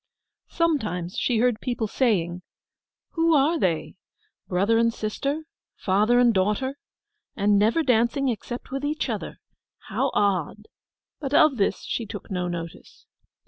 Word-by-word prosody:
Sometimes 215 - -1
she 245 - +1
heard 235 -1 +1
people 245 -3 -2
saying, 185 -7 0 0.7
'Who 330 -1 +2
are 305 +4 +3
they?—brother 185 - -2
and 230 0 +3
sister—father 225 -3 -1
and 240 -2 +5
daughter? 210 +8 0 0.6
And 205 -1 +3
never 225 +10 +3
dancing 250 +2 +2
except 240 +1 -4
with 270 +1 -3
each 300 +2 -1
other—how - - -5
odd?' 200 +1 0 0.5
But 285 -1 -2
of 300 -4 +5
this 200 - 0
she 230 - -3
took - - -8
no 180 -1 -1
notice. 170 -1 -8
230 Hz, 120 wpm, -25 LUFS, 200-275 Hz, 0.7 s, and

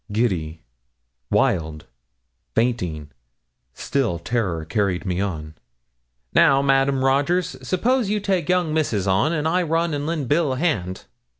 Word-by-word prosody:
Giddy 85 - -1 0.7
wild 80 - 0 0.7
fainting 90 -11 -1 0.6
still 130 -11 -1
terror 85 -4 -2
carried 100 +1 -1
me 90 0 -1
on. 80 -6 -4 0.8
'Now, 135 0 +5
Madame 135 -1 +2
Rogers 165 +7 +1
s'pose 235 +4 0
you 210 0 +1
take 190 -5 -1
young 180 -4 +1
Misses 120 -11 0
on 95 +12 +2
I 175 +3 +2
must 170 - -3
run 165 0 +1
and 145 +1 -2
len' 160 -4 -2
Bill 145 +1 +1
a - - -4
hand.' 105 - -1
135 Hz, 130 wpm, -22 LUFS, -, 0.8 s, Now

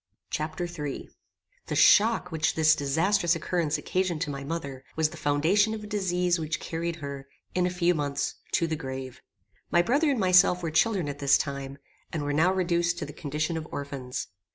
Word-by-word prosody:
Chapter 155 +4 -3
III 150 -5 -6 0.6
The - - -2
shock 215 -4 +5
which 160 0 0
this 160 0 +5
disastrous 165 +5 +2
occurrence 165 -2 -1
occasioned 185 -3 -1
to 160 -4 -1
my 140 0 -5
mother, 140 -4 -5
was 160 -1 +2
the - - -9
foundation 180 +10 +2
of 215 - -8
a 210 0 -8
disease 180 -3 +1
which 160 0 -2
carried 170 +1 -3
her, 140 -3 -7 0.3
in 180 -1 +2
a - - 0
few 180 0 +2
months, 140 -3 -2 0.2
to 170 - +2
the 160 -1 -1
grave. 130 -3 -7 0.5
My 175 - +4
brother 285 - +2
and 270 -4 +1
myself 180 -1 +5
were 165 - -2
children 185 0 +2
at 145 0 -5
this 140 0 +5
time, 140 -1 -4 0.3
and 155 -3 -3
were 145 0 -1
now 160 +5 +4
reduced 175 -2 +1
to 165 - -3
the 145 - -9
condition 150 +2 -2
of 155 - -5
orphans. 140 -5 -5
160 Hz, 190 wpm, -27 LUFS, 145-180 Hz, 0.6 s, shock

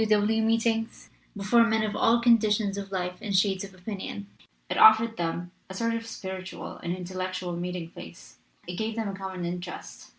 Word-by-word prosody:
W. 215 -1 +4
W. 220 +2 +2
meetings 225 0 0 0.3
before 210 +4 +5
men 220 -1 +2
of 210 -1 -2
all 230 +1 +4
conditions 215 -4 +3
of 200 -1 -6
life 180 -1 -3
and 200 -3 0
shades 195 -1 +2
of 195 -1 -9
opinion. 185 - -6 0.4
It - - -2
afforded 220 +1 +7
them 170 0 -3 0.2
a 190 - -7
sort 230 +3 0
of 230 0 -4
spiritual 190 -3 -6
and 175 +1 -3
intellectual 185 -1 -4
meeting 175 -1 -4
place, 70 - -12 0.3
it 180 0 -5
gave 220 0 -2
them 225 -3 -2
a - - -4
common 190 -2 -5
interest. 175 +1 -6
195 Hz, 185 wpm, -27 LUFS, 180-220 Hz, 0.4 s, afforded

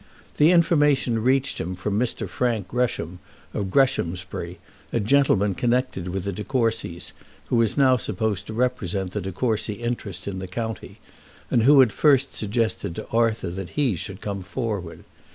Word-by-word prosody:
The 150 +2 +6
information 145 -9 +3
reached 130 +3 +1
him 90 +3 -4
from 100 +3 -1
Mr. 125 -1 -1
Frank 115 -7 -1
Gresham, 115 -8 -1 0.3
of 100 -3 -2
Greshamsbury, 90 -8 0 0.3
a - - +1
gentleman 105 -4 +3
connected 120 -5 0
with 95 +1 -3
the 100 0 -3
De 105 +4 -5
Courcys 115 -9 -1 0.4
who 120 - +2
was 115 +2 +2
now 130 -2 +5
supposed 110 -2 -2
to 110 - -6
represent 100 -6 -1
the 105 - -3
De 95 +1 -4
Courcy 110 +1 -1
interest 120 -5 -4
in 95 -2 -3
the 95 - -5
county, 110 +2 -5 0.5
and 120 - +4
who 140 +4 +7
had 120 -5 +3
first 140 -3 +3
suggested 110 -5 -1
to - - -6
Arthur 115 -5 +1
that 95 0 -6
he 135 -9 +2
should 95 +4 -7
come 100 -2 -4
forward. 100 -4 -4
110 Hz, 165 wpm, -24 LUFS, 95-125 Hz, 0.5 s, who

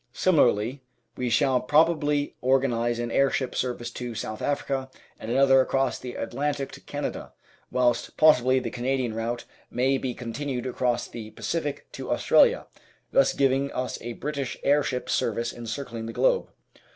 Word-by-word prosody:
Similarly, 130 - +2 0.3
we 125 -1 -2
shall 130 +1 +3
probably 150 0 +2
organise 125 -3 +2
an 120 0 -3
airship 135 -1 +1
service 120 -1 -2
to 120 -1 -6
South 110 -1 -5
Africa 135 -2 -1 0.3
and 110 - -7
another 135 +1 +5
across 135 -1 0
the 125 -1 -7
Atlantic 140 +3 -2
to - - -11
Canada, - - -5 0.4
whilst 125 -1 0
possibly 130 -5 +5
the 120 -3 -4
Canadian 125 -1 -1
route 115 +2 -3 0.2
may 130 +2 +1
be 125 -2 -3
continued 125 +1 -4
across 125 -1 -1
the 110 -2 -8
Pacific 145 +6 -3
to - - -7
Australia, - - +4 0.5
thus - - +4
giving 135 0 +1
us 125 0 -3
a 120 +1 -5
British 140 0 -4
airship 140 -3 +1
service 115 +1 -1
encircling 115 -1 -5
the 115 - -6
globe. - - +2
130 Hz, 145 wpm, -26 LUFS, 120-140 Hz, 0.5 s, another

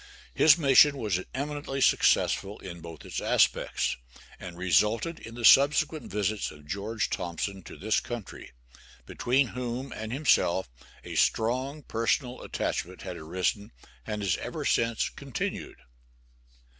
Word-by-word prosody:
His 150 - +6
mission 140 -1 +6
was 105 -7 -1
eminently 145 0 -4
successful 105 -5 +2
in 85 -3 -8
both 85 -2 -10
its - - -4
aspects, - - +1 0.4
and 85 -1 -9
resulted 105 - +1
in 115 - -10
the 120 -1 -2
subsequent 150 +4 +5
visits 105 +1 -1
of 75 -1 -14
George 100 +7 -3
Thompson 90 +2 -3
to - - -10
this 110 +2 +1
country, 120 -4 -8 0.6
between 130 +2 +1
whom 125 +1 -5
and 110 0 -6
himself 120 - +2 0.4
a - - -8
strong 130 +6 0
personal 120 +3 -1
attachment 90 +1 -4
had 90 -2 -6
arisen 90 +5 -2 0.3
and 105 - -4
has 95 -4 +1
ever - - -5
since 115 -1 +1
continued. - - -5
110 Hz, 130 wpm, -28 LUFS, 95-135 Hz, 0.6 s, His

